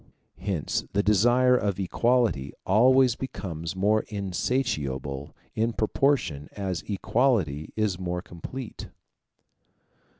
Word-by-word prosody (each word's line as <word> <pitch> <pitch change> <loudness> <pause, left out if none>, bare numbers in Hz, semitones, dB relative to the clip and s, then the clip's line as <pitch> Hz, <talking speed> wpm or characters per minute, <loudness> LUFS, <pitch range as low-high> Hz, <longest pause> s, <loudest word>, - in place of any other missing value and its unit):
Hence 90 -7 -2
the 100 +1 +2
desire 120 +5 +4
of 100 -5 0
equality 110 - +1
always 125 +4 +5
becomes 85 -10 -5
more 105 +3 +2
insatiable 80 - -2 0.2
in 115 +1 0
proportion 110 - 0
as 95 -5 -3
equality 100 - +1
is 105 -4 0
more 90 -1 -3
complete. 110 +9 -8
100 Hz, 95 wpm, -26 LUFS, 85-120 Hz, 0.2 s, always